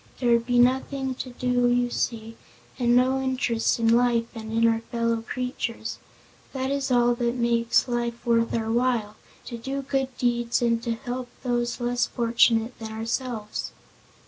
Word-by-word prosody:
There 245 -2 +2
would 235 0 +3
be 245 -1 +2
nothing 265 +2 +2
to 255 - -7
do 245 0 +1
you 245 0 +1
see, 225 -2 -3 0.4
and 240 -1 +3
no 260 +2 +3
interest 255 -3 0
in 230 -1 +1
life 240 -1 +3
and 220 -1 -7
in 230 +1 +3
our 225 0 +2
fellow 230 -1 0
creatures. 230 -2 -4 0.5
That 265 0 -2
is 280 -1 -1
all 240 -1 +4
that 235 0 -1
makes 235 0 +2
life 240 -1 -3
worth 230 -1 +2
our 225 -1 -1
while 235 -3 0 0.3
to 235 -2 -7
do 275 +3 -4
good 270 0 0
deeds 240 -1 +1
and 230 -1 +1
to 235 -1 -2
help 245 +1 -5
those 240 -1 -1
less 245 0 0
fortunate 230 0 +2
than 220 -1 -6
ourselves." 225 0 -4
240 Hz, 165 wpm, -25 LUFS, 230-250 Hz, 0.5 s, all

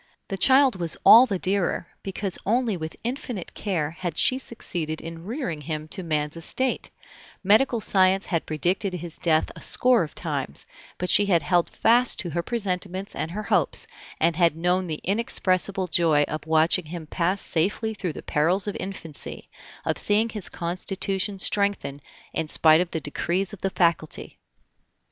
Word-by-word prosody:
The 195 - -3
child 265 +1 +5
was 170 -2 +2
all 245 +3 +9
the 200 -5 -1
dearer, 185 -2 -1
because 195 -1 -2
only 230 0 +1
with 160 -2 -6
infinite 240 -5 -5
care 165 -8 -2
had 175 -2 -5
she 260 - +4
succeeded 165 -11 -5
in 165 +1 -9
rearing 210 - -4
him 155 0 -5
to 190 - -3
man's 150 -3 -2
estate; 255 +10 -1 0.5
medical 225 +5 +4
science 190 -1 +3
had 165 -3 -2
predicted 180 +5 0
his 170 -1 -7
death 160 -2 +1
a - - -11
score 250 -3 +3
of 155 -3 -5
times, 140 - -3 0.3
but 180 - -1
she 205 - +6
had 175 -4 +3
held 175 -2 +2
fast 240 +2 +3
to 175 -5 -5
her 170 +3 -1
presentiments 190 -2 -3
and 160 - -3
her 210 +5 -5
hopes, - - +1 0.3
and 165 +1 +2
had 170 -3 +3
known 180 +2 +1
the 155 -2 -5
inexpressible 195 -2 0
joy 160 -4 +3
of 155 +1 -5
watching 160 +2 +3
him 165 +1 -7
pass 180 +5 -1
safely 205 +8 -1
through 185 -6 -4
the - - -9
perils 170 +6 +1
of 205 - -3
infancy, 165 -6 -7 0.3
of - - 0
seeing 215 +2 +3
his 210 -4 -5
constitution 190 +3 -3
strengthen 195 -9 0 0.3
in 160 - -2
spite 155 +2 +5
of 180 - -2
the 160 - -3
decrees 175 +7 -2
of 205 - -10
the 195 - 0
Faculty. 170 -4 -1
180 Hz, 165 wpm, -25 LUFS, 165-200 Hz, 0.5 s, all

